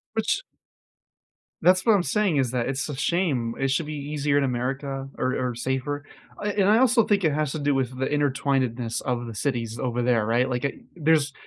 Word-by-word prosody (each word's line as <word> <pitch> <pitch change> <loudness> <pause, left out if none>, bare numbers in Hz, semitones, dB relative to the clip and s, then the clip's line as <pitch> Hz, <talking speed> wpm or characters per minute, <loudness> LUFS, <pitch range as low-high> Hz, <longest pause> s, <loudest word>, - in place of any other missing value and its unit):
Which 225 - 0 1.2
That's 185 +1 +4
what 225 - +6
I'm 180 - +2
saying 200 -8 +1
is 130 -3 +1
that 125 -1 -1
it's 135 +2 -2
a 145 - -5
shame. 135 -5 0
It 135 -1 +1
should 150 +2 0
be 155 - -4 0.2
easier 145 -1 +1
in 140 - +3
America 135 +2 -2
or 130 +1 0
or 125 -2 -2
safer. 130 +4 -2 0.3
Uh, 205 0 -1
and 200 -1 +3
I 215 - +6
also 245 -2 +5
think 200 -3 +2
it 155 - +3
has 150 -2 0
to 155 - -3
do 145 0 +1
with 130 -1 -1
the 130 - 0
intertwinedness 135 -5 0
of 120 -2 -2
the 115 - -7
cities 115 -1 -2
over 120 -1 -1
there, 120 -3 +2
right? 120 +3 +2
Like, 125 +2 -1
I 140 - -1 0.2
there's 155 -3 +2
135 Hz, 210 wpm, -25 LUFS, 125-155 Hz, 1.2 s, what